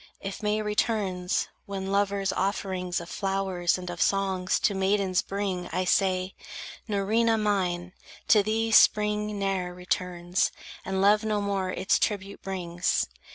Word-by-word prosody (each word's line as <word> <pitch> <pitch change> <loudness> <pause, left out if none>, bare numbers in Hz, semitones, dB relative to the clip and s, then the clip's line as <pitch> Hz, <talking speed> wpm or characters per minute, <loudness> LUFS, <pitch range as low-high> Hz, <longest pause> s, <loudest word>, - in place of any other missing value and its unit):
If 195 +2 -6
May 210 0 0
returns, 205 -4 0 0.2
when 195 -1 -4
lovers 200 -1 +1
offerings 185 -2 -1
Of 170 - -8
flowers 190 -2 0
and 180 0 -8
of 170 -2 -6
songs 190 -2 +1
to 205 - +2
maidens 190 -1 +1
bring, 195 -3 -3
I 185 - -1
say: 185 0 +1 0.6
"Nerina 220 +3 +2
mine, 185 -4 -1 0.4
to 215 - +7
thee 220 +2 0
spring 210 -1 +4
ne'er 190 -3 -1
Returns, 180 0 -1 0.3
and 190 0 -1
love 210 +2 +5
no 215 -1 0
more 200 -2 -1
its 185 +1 +1
tribute 200 -2 -2
brings." 180 -2 -1
195 Hz, 135 wpm, -27 LUFS, 185-205 Hz, 0.6 s, to